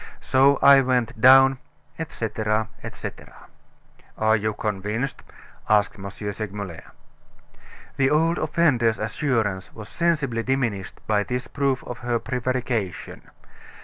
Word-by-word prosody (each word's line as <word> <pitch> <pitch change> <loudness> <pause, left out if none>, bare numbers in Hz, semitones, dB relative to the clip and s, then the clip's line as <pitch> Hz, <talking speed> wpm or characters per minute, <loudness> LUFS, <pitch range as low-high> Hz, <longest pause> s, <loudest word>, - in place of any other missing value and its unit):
So 135 +1 +3
I 140 -1 +8
went 125 -2 -1
down," 135 +1 +7 0.4
etc., 110 -7 -2
etc. - - -8 0.8
"Are 110 0 +3
you 110 0 -1
convinced?" 105 +5 -3 0.5
asked 105 +1 +3
M. 100 0 -6
Segmuller. 100 -3 -6 1.2
The 135 -1 +3
old 165 +3 +2
offender's 145 -8 +2
assurance 110 -4 -2
was 105 -2 -9
sensibly 150 -9 0
diminished 115 -7 -2
by 105 -1 +2
this 125 +4 -3
proof 140 -2 -1
of 125 - -7
her 120 -1 -1
prevarication. 125 -4 -3
120 Hz, 110 wpm, -23 LUFS, 105-135 Hz, 1.2 s, I